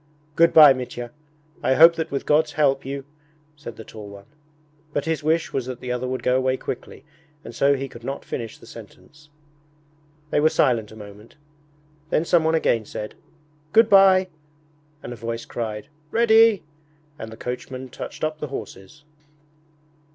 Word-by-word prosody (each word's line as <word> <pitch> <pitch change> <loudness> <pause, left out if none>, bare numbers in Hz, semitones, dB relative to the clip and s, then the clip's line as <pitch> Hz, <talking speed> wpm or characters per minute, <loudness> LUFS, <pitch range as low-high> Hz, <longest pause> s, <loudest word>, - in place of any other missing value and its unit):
'Good 170 0 +5
bye, 150 -3 +9
Mitya! 120 -2 -7 0.5
I 130 - +2
hope 165 +3 +8
that 160 -1 -3
with 140 - -4
God's 150 0 +2
help 140 -3 +1
you...' 135 0 -6 0.5
said 145 -6 -10
the 110 - -10
tall 105 -2 -11
one. 100 0 -13 0.7
But 145 - -2
his 160 -3 -1
wish 160 +2 0
was 130 -2 -2
that 130 -1 -6
the 125 - -5
other 125 +1 -2
would 130 0 -4
go 125 - +2
away 130 0 0
quickly, 130 - -7 0.4
and 115 - -9
so 140 +4 +3
he 135 0 -4
could 120 -2 -13
not 135 +3 -5
finish 115 -3 -6
the - - -17
sentence. 150 0 -15 1.0
They - - +2
were 155 +1 +4
silent 115 -8 +1
a - - -12
moment. 105 +1 -13 0.7
Then 160 - +1
someone 165 -2 +2
again 120 -8 +1
said, 105 +1 -7 0.6
'Good 225 0 +5
bye,' 190 -1 +6 0.7
and 120 - -6
a - - -8
voice 115 0 -5
cried, 110 -2 -5 0.2
'Ready,' 225 -2 +4 0.6
and 110 0 -7
the 110 - -11
coachman 125 +1 -6
touched - - -8
up 155 0 -2
the 150 - -4
horses. 140 +1 -9
135 Hz, 165 wpm, -23 LUFS, 120-155 Hz, 1.0 s, bye